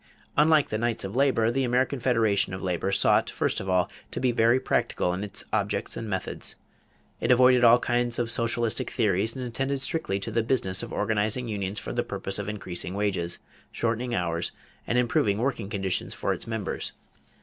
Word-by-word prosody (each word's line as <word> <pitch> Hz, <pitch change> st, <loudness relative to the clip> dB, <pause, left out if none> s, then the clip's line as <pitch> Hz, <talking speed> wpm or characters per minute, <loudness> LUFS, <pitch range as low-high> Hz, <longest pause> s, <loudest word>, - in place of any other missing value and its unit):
= -, -, -29 dB
Unlike 155 Hz, -1 st, +4 dB
the 110 Hz, -, -2 dB
Knights 115 Hz, 0 st, 0 dB
of 95 Hz, +3 st, -5 dB
Labor, 130 Hz, -4 st, +3 dB
the 135 Hz, +2 st, 0 dB
American 130 Hz, +2 st, +1 dB
Federation 110 Hz, -6 st, +2 dB
of 95 Hz, -, -7 dB
Labor 90 Hz, +1 st, -1 dB
sought, 95 Hz, -, +3 dB
first -, -, -1 dB
of 95 Hz, -, -5 dB
all, 90 Hz, -1 st, +3 dB, 0.2 s
to -, -, -5 dB
be 125 Hz, -1 st, +2 dB
very 115 Hz, +2 st, +4 dB
practical 90 Hz, -7 st, 0 dB
in 95 Hz, +3 st, -3 dB
its 105 Hz, -, -5 dB
objects 105 Hz, -1 st, -1 dB
and 115 Hz, -, -5 dB
methods. 95 Hz, -2 st, -2 dB, 0.6 s
It -, -, -1 dB
avoided 125 Hz, 0 st, +6 dB
all 120 Hz, 0 st, +8 dB
kinds 120 Hz, -1 st, 0 dB
of 115 Hz, -2 st, -1 dB
socialistic 115 Hz, 0 st, 0 dB
theories 105 Hz, +3 st, +1 dB
and 130 Hz, -1 st, -4 dB
attended 135 Hz, +3 st, -2 dB
strictly 130 Hz, -, -1 dB
to -, -, -4 dB
the 115 Hz, -, +2 dB
business 110 Hz, -6 st, 0 dB
of -, -, -6 dB
organizing 110 Hz, +3 st, 0 dB
unions 100 Hz, -2 st, -3 dB
for -, -, -4 dB
the 120 Hz, -, +1 dB
purpose 100 Hz, -2 st, -4 dB
of 105 Hz, 0 st, -3 dB
increasing 95 Hz, -3 st, -5 dB
wages, 95 Hz, -4 st, -1 dB, 0.3 s
shortening 120 Hz, +1 st, -1 dB
hours, 85 Hz, -2 st, -1 dB, 0.4 s
and 120 Hz, -, +1 dB
improving 115 Hz, -4 st, +2 dB
working 115 Hz, -4 st, -1 dB
conditions 95 Hz, -3 st, -1 dB
for -, -, 0 dB
its -, -, -7 dB
members. 110 Hz, -3 st, -3 dB
115 Hz, 190 wpm, -27 LUFS, 100-120 Hz, 0.6 s, all